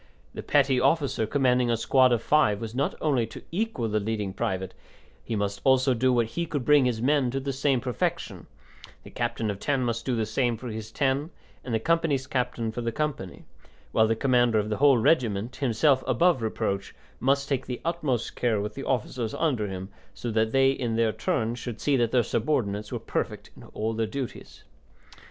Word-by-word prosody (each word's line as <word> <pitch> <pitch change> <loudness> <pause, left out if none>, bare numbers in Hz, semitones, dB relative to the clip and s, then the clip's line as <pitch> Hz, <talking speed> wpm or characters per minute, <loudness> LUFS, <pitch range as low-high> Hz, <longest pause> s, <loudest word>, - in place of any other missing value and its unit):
The - - -6
petty 135 -3 +3
officer 135 -4 +1
commanding 125 -2 +2
a 115 - +2
squad 130 +2 +4
of 120 -1 +1
five 125 -10 +3
was 115 -1 -6
not 135 +3 -1
only 135 -7 +1
to 110 - -11
equal 185 - -1
the 110 0 0
leading 105 -2 -3
private, 95 -1 -3 0.5
he 115 - -3
must 100 -1 -2
also 130 0 +4
do 130 +2 +2
what 120 -2 +2
he 170 +10 -4
could 145 -5 -2
to - - -15
bring 145 -3 +5
his 120 -2 -1
men 140 -1 +2
to 135 +2 -2
the 135 0 -3
same 135 -1 +1
perfection; 125 -3 -3 0.6
the - - -12
captain 115 -2 -2
of 100 - -7
ten 135 0 0
must 115 -1 -2
do 125 0 -1
the 110 -1 0
same 120 +1 0
for 125 +2 -7
his 110 0 -6
ten, 140 +3 0 0.3
and 125 - -6
the 110 - +1
company's 160 -1 +1
captain 125 -4 -2
for 120 - -5
the 115 0 -2
company, 140 - -4 0.5
while 110 - +4
the 115 - +1
commander 120 -2 +3
of 105 0 0
the 105 - -1
whole 140 -2 +5
regiment, 115 -3 +1
himself 130 +2 +2
above 130 +3 +3
reproach, 100 -3 -2 0.2
must 140 +2 +1
take 135 -2 -2
the 125 -1 -4
utmost 150 -9 -1
care 115 -4 +1
with 105 +1 -4
the 135 - -6
officers 120 -2 -2
under 130 -10 0
him 95 0 -6 0.3
so 120 - -4
that 110 0 +1
they 135 +1 +4
in 120 -4 -2
their 115 -1 +2
turn 120 -7 -1
should 120 -2 -6
see 145 - +1
that 120 -3 +2
their 120 0 +3
subordinates 105 -5 -1
were - - -2
perfect - - -4
in - - -14
all 110 +1 -3
their 110 0 -1
duties. 130 +3 -7
120 Hz, 205 wpm, -26 LUFS, 110-135 Hz, 0.6 s, bring